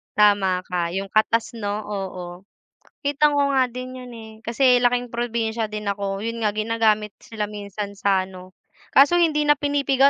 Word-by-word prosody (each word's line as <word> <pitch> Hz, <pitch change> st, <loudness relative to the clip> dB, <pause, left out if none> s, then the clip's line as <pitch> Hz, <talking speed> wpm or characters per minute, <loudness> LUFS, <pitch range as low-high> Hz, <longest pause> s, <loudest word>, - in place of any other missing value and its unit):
tama 195 Hz, -3 st, +3 dB
ka 180 Hz, -2 st, -2 dB
'yung 195 Hz, 0 st, -4 dB
katas 225 Hz, +1 st, +2 dB
'no 210 Hz, -2 st, -4 dB
oo. 185 Hz, -2 st, -6 dB, 0.6 s
Kita 290 Hz, +1 st, +3 dB
ko 285 Hz, -1 st, +1 dB
nga 260 Hz, -2 st, +3 dB
din 255 Hz, +1 st, -7 dB
'yun 250 Hz, -1 st, -10 dB
eh 220 Hz, -1 st, -10 dB
kasi 245 Hz, +2 st, +3 dB
laking 245 Hz, -1 st, +1 dB
probinsya 230 Hz, -2 st, -2 dB
din 210 Hz, 0 st, -5 dB
ako, 200 Hz, -1 st, -2 dB
yun 230 Hz, 0 st, -4 dB
nga 210 Hz, -, +2 dB
ginagamit 215 Hz, -1 st, +1 dB
sila 215 Hz, -2 st, -4 dB
minsan 205 Hz, 0 st, -6 dB
sa 195 Hz, -2 st, +1 dB
ano 185 Hz, 0 st, -13 dB, 0.3 s
kaso 290 Hz, +6 st, +5 dB
hindi 305 Hz, -3 st, +2 dB
na 295 Hz, -, +6 dB
pinipiga 280 Hz, -1 st, +3 dB
220 Hz, 165 wpm, -23 LUFS, 200-250 Hz, 0.6 s, na